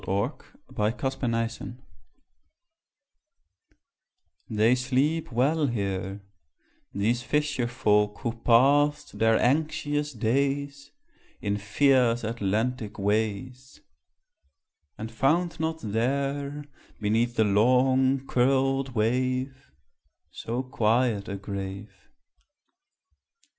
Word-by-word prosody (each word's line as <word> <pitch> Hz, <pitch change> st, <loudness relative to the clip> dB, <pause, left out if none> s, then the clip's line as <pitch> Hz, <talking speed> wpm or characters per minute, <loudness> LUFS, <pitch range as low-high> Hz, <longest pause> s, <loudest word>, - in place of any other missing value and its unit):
IN 100 Hz, +7 st, 0 dB, 0.4 s
A -, -, -15 dB
BRETON 115 Hz, +5 st, -1 dB
CEMETERY 115 Hz, -2 st, -3 dB, 2.7 s
They 110 Hz, +2 st, +3 dB
sleep 135 Hz, +6 st, 0 dB
well 145 Hz, +6 st, +2 dB
here, 100 Hz, -3 st, -3 dB, 0.7 s
These 115 Hz, +5 st, 0 dB
fisher 145 Hz, -3 st, 0 dB
folk 105 Hz, -3 st, +1 dB
who 115 Hz, -, -2 dB
passed 145 Hz, +5 st, +3 dB
their 115 Hz, 0 st, +4 dB
anxious 150 Hz, +1 st, 0 dB
days 140 Hz, +4 st, -1 dB, 0.5 s
In 100 Hz, -1 st, -1 dB
fierce 120 Hz, +3 st, +2 dB
Atlantic 110 Hz, +1 st, -2 dB
ways; 110 Hz, +6 st, -2 dB, 1.2 s
And 110 Hz, +1 st, -6 dB
found 160 Hz, +9 st, +1 dB
not 160 Hz, 0 st, -2 dB
there, 140 Hz, +6 st, -2 dB, 0.3 s
Beneath 115 Hz, +3 st, 0 dB
the 110 Hz, -, +3 dB
long 130 Hz, +5 st, +3 dB
curled 135 Hz, +1 st, +1 dB
wave, 130 Hz, -, -1 dB, 0.6 s
So 120 Hz, +3 st, -4 dB
quiet 115 Hz, -3 st, +1 dB
a 100 Hz, -, -4 dB
grave. 100 Hz, 0 st, -7 dB
125 Hz, 85 wpm, -26 LUFS, 110-135 Hz, 2.7 s, their